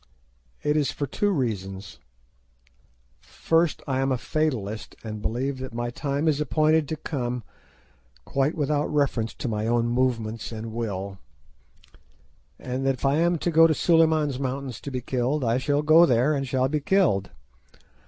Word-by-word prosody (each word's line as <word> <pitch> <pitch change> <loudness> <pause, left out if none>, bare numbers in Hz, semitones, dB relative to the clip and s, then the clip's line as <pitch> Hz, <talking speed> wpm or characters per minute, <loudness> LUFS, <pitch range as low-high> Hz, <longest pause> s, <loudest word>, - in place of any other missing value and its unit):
It 150 0 +1
is 145 -2 +1
for 145 - -3
two 205 - 0
reasons. 100 - -3 1.2
First 165 -1 0
I 130 -1 0
am 135 0 +1
a 130 - +1
fatalist, 120 -8 -2
and 110 -2 -6
believe 130 +5 -2
that 130 -3 -7
my 120 0 -2
time 140 +4 -2
is 150 -1 +2
appointed 155 +1 +2
to 160 - -3
come 125 -6 -4 0.8
quite 140 +3 0
without 150 -1 0
reference 135 -6 0
to - - -4
my 110 -1 -2
own 120 0 +2
movements 120 -3 -1
and 110 0 -6
will, 100 -4 -4 1.4
and 130 +1 -4
that 135 - +2
if 130 - -5
I 135 +2 +3
am 170 +1 +2
to 175 - -1
go 165 0 +7
to 155 - +1
Suliman's 160 -5 +3
Mountains 135 -2 -4
to - - -6
be 130 -2 -4
killed, 130 +4 -1
I 115 +1 +1
shall 145 +2 0
go 160 +3 +7
there 125 +4 +3
and 135 -2 -2
shall 130 0 +1
be 150 +3 -1
killed. 145 - +2
135 Hz, 165 wpm, -25 LUFS, 120-150 Hz, 1.4 s, go